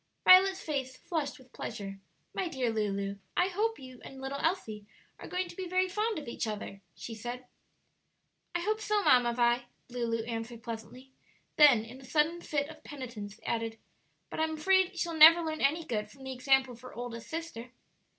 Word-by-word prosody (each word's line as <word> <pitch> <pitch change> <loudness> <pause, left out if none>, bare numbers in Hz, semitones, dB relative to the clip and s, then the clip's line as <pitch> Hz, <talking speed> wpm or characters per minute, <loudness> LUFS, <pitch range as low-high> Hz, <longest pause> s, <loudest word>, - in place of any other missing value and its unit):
Violet's 380 +1 +7
face 265 -4 -3
flushed 300 -3 -3
with 260 -1 -19
pleasure. 195 -3 -6 0.3
"My 375 - -1
dear 260 -7 -1
Lulu, 200 -2 -2 0.2
I 360 +1 +3
hope 440 +4 0
you 255 -2 -12
and 270 - -10
little 270 +1 -4
Else 360 -1 0 0.5
are - - -8
going 365 0 -2
to 345 - -11
be 370 0 -5
very 370 +1 +2
fond 425 +3 -1
of 300 - -6
each 235 - -3
other," 205 -2 -5
she 235 - -7
said. 240 +3 -6 1.1
"I 350 - +1
hope 430 +4 -1
so, 420 -1 +1
Mamma 245 -5 +5
Vi," 240 0 +2 0.3
Lulu 230 -2 -1
answered, 230 0 -5
pleasantly; 235 +3 -8 0.5
then, 270 -8 +7
in 250 +4 -11
a - - -14
sudden 310 +5 +1
fit 290 -3 -1
of 310 0 -12
penitence, 230 -7 -8
added, 225 -1 -2 0.5
"but - - -5
I'm 315 0 0
afraid 375 +2 +3
she'll 340 -1 -1
never 325 +2 +9
learn 315 -1 -3
any 310 +5 +2
good 210 -3 -2
from 265 +5 -15
the 265 0 -4
example 265 0 +2
of 235 - -15
her 255 - -11
oldest 235 -1 -6
sister." 320 -8 -6
265 Hz, 185 wpm, -31 LUFS, 235-335 Hz, 1.1 s, never